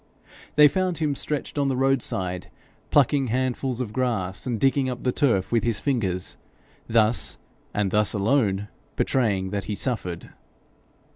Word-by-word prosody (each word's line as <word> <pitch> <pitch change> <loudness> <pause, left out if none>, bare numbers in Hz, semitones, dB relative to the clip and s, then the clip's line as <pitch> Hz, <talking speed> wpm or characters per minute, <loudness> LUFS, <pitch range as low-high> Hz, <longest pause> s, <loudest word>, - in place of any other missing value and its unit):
They 150 0 +8
found 185 +2 0
him 155 -3 0
stretched 150 +1 -2
on 140 - +2
the 130 -2 0
roadside, 105 -9 0 0.4
plucking 140 -1 +3
handfuls 130 +1 -1
of 115 -5 -4
grass, 115 -6 -1
and 120 -3 -1
digging 135 +2 +2
up 125 -1 -5
the 125 - +2
turf 115 -9 +1
with 115 -1 +2
his 115 -3 +1
fingers, 100 -10 -1 0.5
thus, 115 0 +3 0.3
and 100 -2 -1
thus 105 0 +2
alone, 105 -2 +1 0.3
betraying 100 -7 0
that 100 -1 -3
he 105 - -3
suffered. 100 -9 -3
120 Hz, 145 wpm, -25 LUFS, 100-135 Hz, 0.5 s, They